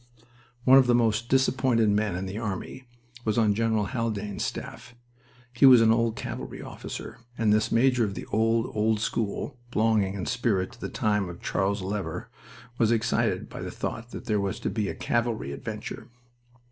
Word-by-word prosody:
One 130 +1 +8
of 130 - +3
the 120 - +4
most 115 0 +1
disappointed 130 -3 +3
men 105 -2 +1
in 90 +2 -3
the 95 +3 -5
army 110 +4 -5 0.4
was 110 -1 0
on 110 -3 +4
General 110 -1 +1
Haldane's 105 -4 -3
staff. 120 - -6 0.6
He 125 +3 +6
was 125 -2 +9
an 115 -1 +5
old 115 0 +2
cavalry - - -6
officer, - - -8 0.2
and 110 -2 +3
this 110 0 +1
major 125 0 +3
of 100 -3 -2
the - - -6
old, 115 +2 +1
old 110 0 +2
school 115 +4 -2
(belonging 110 -4 +2
in 95 - -4
spirit 115 -5 0
to 120 - -17
the - - -4
time 105 -4 0
of 85 - -9
Charles 100 0 -1
Lever) 100 +1 -4 0.5
was 115 -1 +3
excited 115 0 +1
by - - -8
the - - -4
thought 115 +1 -5
that - - -8
there 105 -4 +1
was 100 -1 -2
to - - -2
be 105 -3 -1
a - - -4
cavalry 115 - -1
adventure. 70 - -6
110 Hz, 180 wpm, -27 LUFS, 105-120 Hz, 0.6 s, was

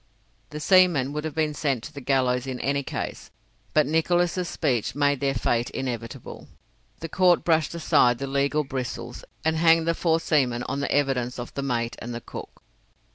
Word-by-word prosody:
The 150 - -6
seamen 165 -6 +4
would 150 +1 -3
have 155 -2 -5
been 155 -1 0
sent 140 -6 -1
to 150 - -9
the 140 - -8
gallows 130 -1 +1
in 130 -1 -4
any 140 +2 0
case, - - -5 0.4
but 155 -1 +4
Nicholas' 175 +4 +1
speech 120 -5 -1
made 145 -1 +2
their 135 0 0
fate 120 0 0
inevitable. 120 -3 -6 0.5
The 165 - -4
court 180 +1 +3
brushed 160 -1 +1
aside 125 -7 +3
the 140 - -4
legal 140 +2 0
bristles, 130 -3 -5 0.2
and 160 0 +2
hanged 165 0 +4
the 165 - +3
four 165 -1 +1
seamen 130 -7 +1
on 135 +3 -3
the 140 - -2
evidence 135 -4 0
of 120 -1 -7
the 140 - -3
mate 120 -3 -2
and 120 0 -6
the - - -4
cook. - - -10
140 Hz, 185 wpm, -25 LUFS, 125-160 Hz, 0.5 s, seamen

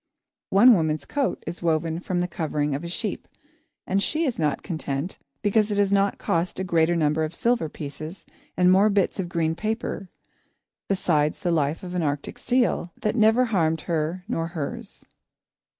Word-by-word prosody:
One 235 +6 +7
woman's 155 -6 0
coat 280 - -1
is 175 - -6
woven 165 0 0
from 180 0 -1
the 180 - 0
covering 150 -4 -1
of 140 +4 -3
a - - -4
sheep, 170 - -3 0.6
and 195 +1 +1
she 315 +9 0
is 255 - -2
not 150 -3 0
content 155 -1 -4 0.2
because 210 +1 +3
it 205 - -1
has 200 -1 +3
not 200 0 +2
cost 170 +3 -1
a - - -1
greater 170 -1 +2
number 155 -1 +1
of 155 +2 -3
silver 235 -8 +1
pieces 155 +4 -8 0.3
and 180 0 +5
more 195 +3 +5
bits 200 -1 +1
of 180 -2 -2
green 165 -2 0
paper, 215 -1 -3 0.8
besides 155 -6 +1
the 175 - 0
life 155 +2 0
of 180 -1 -6
an 180 - 0
Arctic 145 -2 -3
seal, 245 -8 +1
that 215 -4 -1
never 225 +2 +4
harmed 165 -8 +1
her 165 +2 -2
nor 165 -8 -1
hers. 160 -5 -6
175 Hz, 175 wpm, -25 LUFS, 160-200 Hz, 0.8 s, One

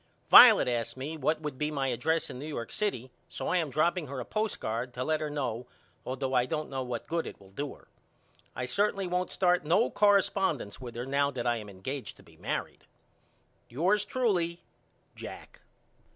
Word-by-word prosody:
Violet - - +10
asked 115 -1 -2
me 145 +5 -4
what 155 +1 0
would 150 -4 -5
be 150 0 0
my 140 -3 -1
address 155 +6 0
in 125 - -8
New 145 - -6
York 120 -7 -5
City 130 - -2 0.2
so - - -5
I 180 - +2
am 165 -4 0
dropping 155 +3 +1
her 135 0 -5
a 125 - -5
postcard 125 - -2
to 125 - -2
let 155 +2 0
her 155 - -2
know 125 -5 -3 0.4
all 130 - -3
though 135 0 -3
I 125 -1 +3
don't 155 +1 -3
know 135 -1 -2
what 125 -2 -4
good 165 0 -2
it - - -9
will 95 -1 -17
do 140 +8 -5
her. - - -22 0.7
I 125 - -3
certainly 200 +8 0
won't 180 0 -1
start 180 -2 +2
no 150 -4 +2
correspondents 195 - +2
with 120 -2 -8
her 120 +1 -4
now 140 +1 +1
that 125 -4 -5
I 120 -1 +2
am 105 -2 -8
engaged 125 +8 -6
to - - -17
be - - -19
married. - - -4 0.8
Yours 185 - +2
truly, 195 -7 0 0.5
JACK. - - -10
145 Hz, 195 wpm, -29 LUFS, 125-170 Hz, 0.8 s, Violet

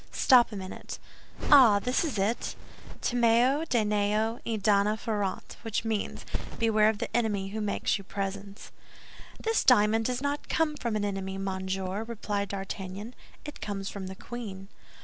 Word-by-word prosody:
Stop 245 -3 +5
a - - -6
minute—ah, 210 +5 +2
this 250 - 0
is 300 -9 -2
it: 205 +5 -1 0.5
'Timeo 245 +5 +3
Danaos 215 -2 +1
et 220 -3 -2
dona 210 +1 +3
ferentes,' 205 -4 -3
which 225 0 -2
means, 220 -2 -2 0.3
'Beware 220 -2 +4
of 220 - -1
the 225 - -4
enemy 210 -5 0
who 215 +2 -4
makes 205 -1 0
you - - -10
presents." 195 +1 -5 0.7
"This 450 0 +1
diamond 225 -3 +4
does 250 0 0
not 285 +1 -3
come 315 -2 +1
from 235 -6 -2
an 205 -1 0
enemy, 195 -1 -3
monsieur," 190 +1 -3
replied 210 -3 -3
D'Artagnan, 195 +2 -5 0.3
"it 295 - -8
comes 200 -1 -4
from 195 -2 -6
the 190 - -7
queen." 195 -4 -8
210 Hz, 150 wpm, -28 LUFS, 195-235 Hz, 0.7 s, Stop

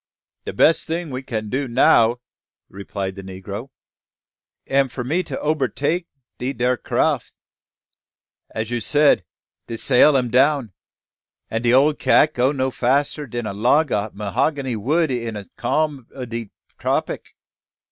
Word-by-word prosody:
"De - - -3
bess 165 - +4
ting 165 -1 -3
we 130 0 -4
can 110 -5 -4
do 130 +5 -2
now," 115 0 +4 0.5
replied 100 0 -5
the 100 - -9
negro, 95 +6 -7 1.0
"am 135 0 +2
for 125 0 -6
me 155 +9 0
to 180 - -5
obertake 155 - -1 0.3
dat 130 -1 -4
ere 125 +1 +2
craff. - - -1 1.2
As 110 +1 -4
you 120 -1 -1
said, 145 -6 +3 0.4
de 115 - -5
sail 135 +4 +5
am 125 -3 -1
down; 130 -3 +2 0.8
an' 115 - -1
de 120 0 +2
ole 140 +4 +5
Cat 155 +1 +3
no 125 +2 +3
go 130 0 0
fasser 140 +4 0
dan 120 0 -4
a 100 - -3
log 125 +8 +2
o' 105 +1 0
'hogany 125 +6 -1
wood 150 +8 +1
in 115 -3 -3
a 100 -1 -6
calm 140 0 -1
o' 130 -2 -5
de 115 -2 -6 0.3
tropic. - - -2
125 Hz, 145 wpm, -21 LUFS, 115-145 Hz, 1.2 s, sail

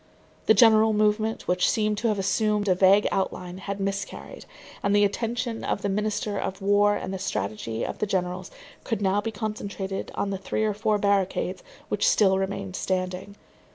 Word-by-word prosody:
The 220 - +6
general 220 -2 +6
movement, 215 +1 +1
which 180 0 +2
seemed 215 -1 +1
to 235 - 0
have 215 -2 +1
assumed 210 +2 +1
a 185 - +5
vague 195 +3 +5
outline, 185 -1 -3
had 200 +1 -5
miscarried; 195 0 -5 0.3
and 200 +1 +1
the 205 0 +5
attention 230 +3 -2
of 195 - -2
the 200 - 0
minister 210 0 -1
of 190 - -4
war 205 +1 +3
and 190 -1 -4
the 190 - -4
strategy 110 - -3
of - - -6
the 210 - 0
generals 180 -1 -2 0.3
could 225 - -2
now 195 +1 +2
be 225 - -3
concentrated 200 -2 -4
on 200 - -1
the 195 - -3
three 215 - -2
or 215 -1 +1
four 210 +1 +1
barricades 195 -2 0 0.3
which - - +2
still 190 -2 +4
remained 195 -1 -3
standing. 185 +2 -3
200 Hz, 180 wpm, -26 LUFS, 190-210 Hz, 0.3 s, The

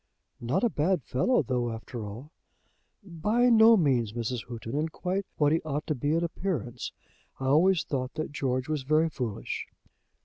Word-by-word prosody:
"Not 130 +11 0
a 240 - +4
bad 165 0 +1
fellow, 190 - +2
though, 125 -2 -1
after 115 +1 -6
all." 120 +9 -9 0.7
"By 210 +7 +1
no 225 0 +7
means, 125 - +2
Mrs. 120 0 -3
Houghton, 115 0 -6
and 155 +2 -1
quite 190 +3 -2
what 145 -1 +3
he 160 - +2
ought 150 -1 -3
to 155 - 0
be 145 +3 0
in 165 - +1
appearance. 160 - -3 0.5
I 135 - -4
always 165 +6 +4
thought 130 -1 -3
that 155 -1 -3
George 130 -2 -1
was 155 -2 -1
very 155 +4 +2
foolish." 120 -8 -4
145 Hz, 170 wpm, -28 LUFS, 125-170 Hz, 0.7 s, no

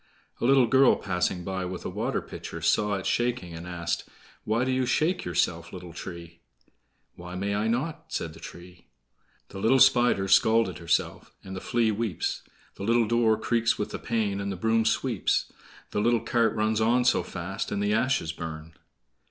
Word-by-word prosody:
A - - -1
little 135 0 +5
girl 130 +2 +5
passing 90 -2 -2
by 95 0 -3
with 90 0 -6
a - - -2
water - - -2
pitcher - - -8
saw 105 -1 +2
it 95 - -5
shaking, 120 -8 -1
and 85 +2 -8
asked: 85 -2 -3 0.4
"Why 110 +3 +1
do 130 - 0
you 130 -1 0
shake 175 +7 +1
yourself, 85 -1 -1
little 90 -2 -9
tree?" 85 -1 -9 0.8
"Why 90 +1 -9
may 100 +2 -2
I 105 +2 0
not?" 155 +8 -2
said 80 - -4
the - - -13
tree: 90 0 -12 0.6
"The 95 - -8
little 115 +7 +4
Spider's 120 -7 +4
scalt 110 -4 +4
herself, 85 0 -1
And 95 0 -8
the 95 - -6
Flea 115 -2 +1
weeps; 105 -4 -2 0.4
The - - -6
little 115 +2 +3
door 115 -1 +3
creaks 115 +1 +1
with 105 - -3
the - - -5
pain, 105 -4 -1
And 100 0 -3
the - - -3
broom 110 +4 +1
sweeps; 115 -3 0 0.4
The 105 - 0
little 120 0 +2
cart 115 0 +1
runs 110 0 +1
on 120 +3 +3
so - - +4
fast, 95 +5 -5
And 100 - -1
the 105 +1 +1
ashes 110 -7 +1
burn." 80 0 -7
105 Hz, 185 wpm, -27 LUFS, 90-120 Hz, 0.8 s, little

